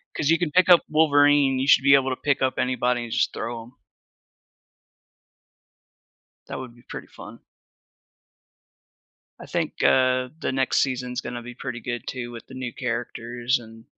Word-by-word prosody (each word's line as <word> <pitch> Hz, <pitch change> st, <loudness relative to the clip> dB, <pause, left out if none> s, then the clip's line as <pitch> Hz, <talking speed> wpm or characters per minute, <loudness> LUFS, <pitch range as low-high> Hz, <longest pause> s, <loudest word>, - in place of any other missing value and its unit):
'cause 150 Hz, -, -1 dB
you 165 Hz, -, +5 dB
can 165 Hz, -4 st, -1 dB
pick 185 Hz, +2 st, +3 dB
up 175 Hz, -, +8 dB
Wolverine, 145 Hz, -3 st, +4 dB
you 135 Hz, -, -1 dB
should 135 Hz, -, +5 dB
be 140 Hz, 0 st, +6 dB
able 135 Hz, -1 st, +2 dB
to 130 Hz, -, -1 dB
pick 140 Hz, 0 st, -1 dB
up 130 Hz, 0 st, 0 dB
anybody 125 Hz, -1 st, 0 dB
and 115 Hz, -, -8 dB
just 125 Hz, -, +1 dB
throw 115 Hz, -1 st, -5 dB
'em. 120 Hz, +2 st, -17 dB, 2.8 s
That -, -, -5 dB
would 125 Hz, -2 st, -9 dB
be 120 Hz, -, -19 dB
pretty -, -, -8 dB
fun. -, -, -12 dB, 2.0 s
I -, -, -10 dB
think, -, -, -3 dB
uh, 130 Hz, -1 st, +3 dB
the -, -, -2 dB
next 130 Hz, 0 st, 0 dB
season's 125 Hz, -1 st, -2 dB
gonna 120 Hz, -1 st, -6 dB
be 120 Hz, 0 st, -9 dB
pretty 120 Hz, 0 st, -6 dB
good 120 Hz, +1 st, -6 dB
too, 120 Hz, -2 st, -5 dB
with 115 Hz, -, -11 dB
the 130 Hz, -, -12 dB
new 125 Hz, -2 st, -5 dB
characters 120 Hz, +1 st, -2 dB
and 115 Hz, 0 st, -14 dB
125 Hz, 165 wpm, -24 LUFS, 120-135 Hz, 2.8 s, up